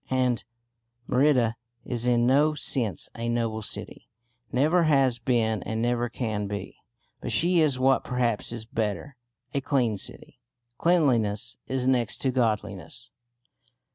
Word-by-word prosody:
And 125 -3 +1 0.6
Merida 125 -4 +3 0.3
is 120 -1 -2
in 120 -1 +3
no 145 +4 +4
sense 120 - 0
a 115 0 -3
noble 115 -2 -1
city; - - -6 0.4
never 160 +7 +3
has 135 -5 +3
been 115 -3 +1
and 110 0 -3
never 120 +1 0
can 110 -4 -3
be. 100 0 -6 0.4
But 120 - -5
she 170 - +3
is 150 -5 +3
what 130 +1 +3
perhaps 120 -4 0
is 115 -2 -5
better 110 +5 -3 0.4
a 140 - 0
clean 120 -7 +1
city. - - -9 0.4
Cleanliness 125 - +2
is 130 -1 -1
next 120 -4 +2
to 130 - +1
godliness. 105 -5 -2
120 Hz, 135 wpm, -26 LUFS, 110-135 Hz, 0.6 s, no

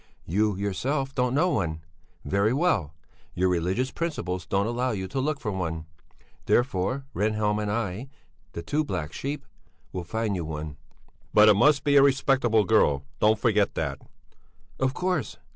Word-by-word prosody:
You, 105 +4 +1
yourself, 135 +9 -2
don't 125 0 0
know 175 +5 +3
one. 80 - -1 0.4
Very 100 +9 +2
well! 115 - +1 0.4
Your 95 +1 +2
religious 90 +9 0
principles 95 - -3
don't 100 +1 +1
allow 120 +3 -1
you 95 -2 -3
to 135 - -3
look 145 +2 -1
for 110 - -3
one; 80 -4 -3 0.6
therefore 125 +2 +1
Rehnhjelm 105 0 0
and 105 -1 -2
I, 110 +3 -3 0.4
the 85 - -6
two 150 - 0
black 90 - -4
sheep, 140 +1 -4 0.5
will 90 - -3
find 105 +3 -2
you 90 - -2
one." 75 -1 -6 0.6
"But 105 0 +8
it - - +8
must 140 +6 +4
be 145 -2 +4
a - - +8
respectable 135 -5 +3
girl, 75 -11 +3 0.2
don't 110 +1 +4
forget 105 -3 +2
that." 70 -3 -3 0.8
"Of 130 +1 0
course! 180 -6 -1
105 Hz, 160 wpm, -26 LUFS, 90-135 Hz, 0.8 s, But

